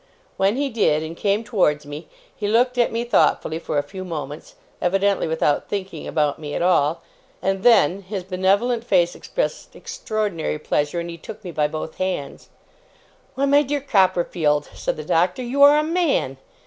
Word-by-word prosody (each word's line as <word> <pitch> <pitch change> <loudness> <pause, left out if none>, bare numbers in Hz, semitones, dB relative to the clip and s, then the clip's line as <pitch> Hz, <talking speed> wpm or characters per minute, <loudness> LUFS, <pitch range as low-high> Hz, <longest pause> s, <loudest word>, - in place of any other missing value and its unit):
When 195 +3 +2
he 280 +1 -1
did, 155 -9 +2
and 160 +1 -6
came 205 +4 0
towards 165 -9 +1
me, 145 +2 -8 0.3
he 205 - -3
looked 245 +3 +2
at 240 - +3
me 230 +1 -1
thoughtfully 165 -8 +1
for 155 - -3
a 145 - +2
few 185 +6 -8
moments, 150 -4 -7 0.3
evidently 195 +1 +1
without 160 -2 0
thinking 190 -5 -5
about 150 -2 0
me 145 -2 -6
at - - -1
all; 165 -3 +2 0.4
and 195 0 -1
then 200 -5 +4
his 190 0 -5
benevolent 200 +6 +1
face 175 -6 +2
expressed - - -4
extraordinary 215 - -3
pleasure, 150 +2 -1
and 170 0 -5
he 170 - -10
took 215 +6 -10
me 180 - -6
by 150 -2 +1
both 155 +1 -6
hands. 185 -7 -4 0.9
'Why, 275 - +1
my 285 +1 +5
dear 290 0 -1
Copperfield,' 180 - +1
said - - -3
the 155 - -7
Doctor, 180 +10 +1
'you 260 +4 -1
are 285 +1 +8
a 300 - +2
man! 315 - 0
185 Hz, 175 wpm, -22 LUFS, 155-225 Hz, 0.9 s, are